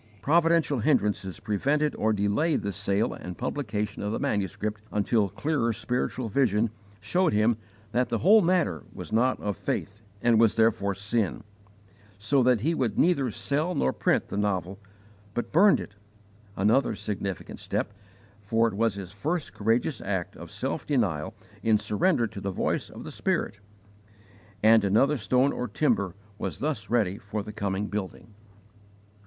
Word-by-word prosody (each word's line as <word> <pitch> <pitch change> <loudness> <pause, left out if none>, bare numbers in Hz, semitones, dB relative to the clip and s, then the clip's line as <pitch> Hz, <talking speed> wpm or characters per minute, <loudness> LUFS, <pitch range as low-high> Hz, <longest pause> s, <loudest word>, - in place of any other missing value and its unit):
Providential 165 -2 +3
hindrances 105 - +1
prevented 145 +9 0
or 110 - +1
delayed 105 +10 +1
the 100 - -1
sale 100 +2 0
and 90 -1 -8
publication 105 -6 -3
of 105 - -2
the - - -1
manuscript 105 +2 -2
until 105 0 +1
clearer 145 - 0
spiritual 120 +2 -2
vision 110 -2 +2 0.3
showed 180 -7 +1
him 110 +2 +3 0.4
that 125 +1 +1
the 115 - 0
whole 210 - +6
matter 175 - +1
was - - -8
not 125 +3 +2
of 105 -2 -2
faith 105 +5 -4 0.2
and 115 0 +3
was 115 -2 +4
therefore 105 -3 +2
sin, 100 +1 -1 0.7
so 130 +7 +2
that 125 -3 +3
he 160 +7 +1
would 125 -8 -1
neither 150 -7 +3
sell 150 - -1
nor 65 - +1
print - - +1
the - - -4
novel, 100 -2 -1 0.6
but 120 - -3
burned 195 +6 +6
it 105 - -8 0.6
another 110 +8 +2
significant 100 -2 -5
step, - - -2 0.5
for 115 +3 +2
it 110 - -3
was 110 0 +1
his 95 -3 -7
first 155 - -3
courageous 115 +7 0
act 95 -3 -3
of - - -10
self - - -3
denial 100 - -1 0.3
in 110 -1 +3
surrender 120 - +1
to 100 -3 -7
the 100 - -2
voice 95 - -1
of - - -10
the - - -7
Spirit 100 - -1 1.0
and 110 0 +6
another 110 +9 +3
stone 130 +3 +2
or 125 - -3
timber 100 - 0 0.2
was - - -3
thus 140 -9 -3
ready 105 -5 +1
for 100 +1 -4
the 105 +1 -8
coming 100 -1 -2
building. 105 +1 -5
110 Hz, 155 wpm, -27 LUFS, 100-135 Hz, 1.0 s, whole